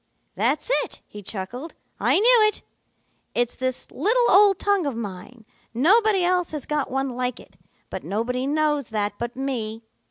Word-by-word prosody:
"'That's - - 0
it,' - - -10
he 210 - -11
chuckled. 225 - -7 0.2
'I - - +3
knew 450 +1 +6
it. 425 - -3 0.7
It's 240 0 +1
this 255 -1 -3
little 480 +4 +2
old 400 -1 +6
tongue 400 -6 +1
of 275 - -3
mine. 220 +2 -8 0.3
Nobody 395 - +4
else 360 -2 +1
has 300 -4 -5
got 300 -2 -1
one 270 +1 -1
like 250 0 -3
it, - - -17 0.4
but - - -5
nobody 250 +5 -2
knows 295 -2 +1
that 210 -2 -2
but 235 0 -4
me. 230 -5 -4
270 Hz, 160 wpm, -24 LUFS, 235-365 Hz, 0.7 s, knew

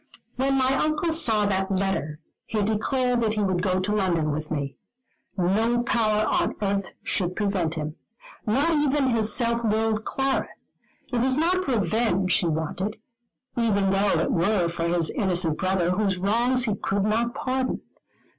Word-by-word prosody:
When 270 +1 +1
my 260 0 +3
Uncle 310 +2 0
saw 230 -10 +3
that 190 -1 0
letter, 190 -6 -1 0.3
he 215 -2 -1
declared 245 +4 0
that 220 -1 0
he 210 - 0
would 185 -2 0
go 185 -1 +1
to 195 +3 -1
London 170 -6 +1
with 155 +1 -4
me. 140 -3 -3 0.6
No 220 +7 +1
power 215 -3 +1
on - - 0
earth 200 -2 -1 0.2
should 180 -2 -1
prevent 190 -6 -1
him. 155 0 -5 0.5
Not 275 +10 +2
even 290 -3 +2
his 220 -2 +2
self 235 0 +1
willed 220 0 +1
Clara. 270 +2 -1 0.6
It 240 - +1
was 260 +1 +2
not 365 +4 +1
revenge 205 -4 +1
he 175 - 0
wanted: 165 +6 -2 0.6
even 200 -5 +2
though 195 -3 +2
it 165 - 0
were 175 0 +1
for 170 0 -2
his 170 -2 +1
innocent 175 -5 0
brother, 185 -2 +1
whose 195 0 0
wrongs 235 +7 +1
he 215 - 0
could 200 0 -1
not 230 +3 0
pardon. 260 0 -2
210 Hz, 160 wpm, -25 LUFS, 185-235 Hz, 0.6 s, my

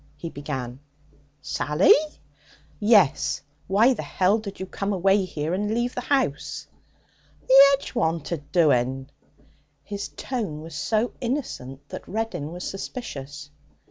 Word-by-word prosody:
he 165 - -6
began. 130 -4 -5 0.6
'Sally?' 150 +4 +4 0.9
'Yes. 205 - +3 0.2
Why 220 +7 +5
the - - -5
h 195 +4 +1
did 200 -2 -8
you 190 - -3
come 200 +2 -3
away 195 +1 +3
here 160 -2 -3
and 205 +3 -1
leave 240 +1 0
the 250 - -3
house?' 255 - -1 0.8
'The - - +3 0.2
'edge 275 - -9
wanted 165 - -2
doing.' 135 -5 +2 0.7
His 200 +5 -5
tone 205 - -4
was 165 0 -10
so 220 +9 0
innocent 145 - -4
that - - -8
Reddin 215 -8 -3
was 180 +1 -5
suspicious. 145 - -7
180 Hz, 125 wpm, -25 LUFS, 145-215 Hz, 0.9 s, Why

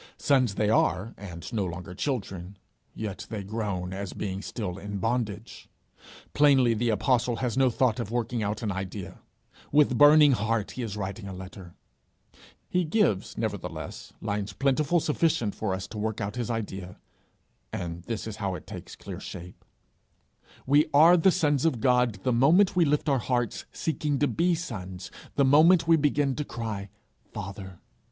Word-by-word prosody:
Sons 130 -7 +2
they 105 - +1
are 105 0 +1
and 90 +1 -9
no 105 -3 0
longer 90 0 -6
children, 95 -6 -4 0.4
yet 105 -3 -5
they 105 -3 -4
groan 100 -3 -3
as 100 -1 -5
being 95 -1 -4
still 100 -5 -5
in 100 +1 -5
bondage! 115 0 -3 0.6
Plainly 135 -5 +5
the 115 +2 0
apostle 120 +3 +1
has 120 -1 -2
no 130 -1 +4
thought 125 0 +1
of 115 -4 -3
working 120 0 -2
out 105 +2 -2
an 105 - -1
idea; 95 0 -6 0.5
with 145 -4 +4
burning 150 0 +8
heart 110 -2 0
he 130 - -6
is 110 -3 -4
writing 100 +1 -5
a 95 - -6
letter: 95 -1 -10 0.9
he 180 0 +1
gives, 155 - 0
nevertheless, 90 -9 -5
lines 105 -1 -3
plentifully 145 - +1
sufficient 150 -9 +1
for 110 -3 -3
us 95 0 -3
to 110 - -6
work 110 0 -2
out 100 +2 -3
his 120 -2 -3
idea, 95 -5 -4 0.7
and 85 -1 -5
this 115 -2 -4
is 110 -1 -6
how 100 -3 -2
it 85 - -9
takes - - -9
clear - - -8
shape: 90 0 -9 1.0
We 145 +3 +4
are 165 +4 +8
the 180 +2 +5
sons 150 -7 +1
of 160 -8 +1
God 125 -5 +2
the 125 - +1
moment 165 +12 +4
we 175 -2 +4
lift 150 +1 +1
up 145 - +3
our 135 - +2
hearts, 120 -1 -2
seeking 150 -2 -1
to 145 - +2
be 170 +8 +1
sons 95 - -6 0.2
the 140 - +4
moment 160 +5 +5
we 165 - +6
begin 145 -2 +1
to 150 - -1
cry 110 -6 -5 0.4
Father. 95 -2 -7
115 Hz, 170 wpm, -27 LUFS, 100-140 Hz, 1.0 s, burning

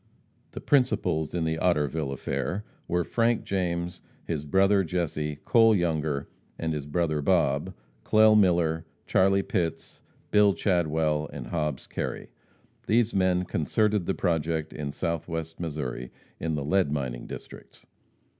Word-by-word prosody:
The - - -6
principals 90 - +1
in 85 - 0
the 80 0 -1
Otterville 75 -4 +1
affair 70 +9 -3 0.2
were 90 0 +1
Frank 115 +5 +1
James, 90 -2 -2 0.2
his 75 -3 -3
brother 95 +5 +3
Jesse, 75 -3 -2
Cole 115 -2 +5
Younger, 80 -5 -1 0.3
and 80 -1 -2
his 75 -2 -4
brother 75 -1 0
Bob, 85 +1 +1 0.3
Clell 110 0 +5
Miller, 85 -5 +3 0.2
Charlie 95 +1 +3
Pitts, 85 -7 -3 0.3
Bill 105 -1 +5
Chadwell 80 -4 +1
and - - -7
Hobbs 75 -4 -2
Kerry. - - -5 0.6
These 115 +1 +3
men 90 -1 +2
concerted 100 +5 0
the 95 - 0
project 80 -2 -1
in 75 -2 -4
Southwest 80 0 -4
Missouri, 75 -7 -4 0.3
in 80 -1 -1
the 70 -2 -3
lead 90 -1 +2
mining 65 -5 -3
districts. - - -11
85 Hz, 130 wpm, -27 LUFS, 75-95 Hz, 0.6 s, Cole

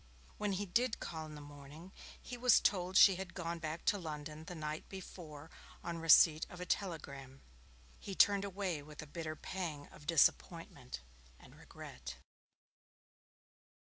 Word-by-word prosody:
When 210 -1 0
he 200 +2 -1
did 235 +6 +1
call 160 -2 -5
in 155 - -9
the 150 - -9
morning, 145 +4 -11 0.3
he 250 - -7
was 245 0 +6
told 185 -1 +1
she 195 -3 +8
had 190 -1 -7
gone 170 -1 -3
back 160 +1 -5
to 205 -3 +3
London 155 -1 -6
the 175 - -7
night 155 -1 -5
before 165 -5 -9 0.3
on 170 -1 -4
receipt 160 -1 +7
of 180 - -10
a 180 - -4
telegram. 140 -9 -4 0.6
He 195 - -6
turned 200 0 +5
away 190 -5 -2
with 150 +1 -9
a - - -9
bitter 155 +1 -5
pang 155 -4 -5
of 145 - -15
disappointment 140 - +1 0.4
and - - -16
regret. - - -9
165 Hz, 150 wpm, -36 LUFS, 150-190 Hz, 0.6 s, she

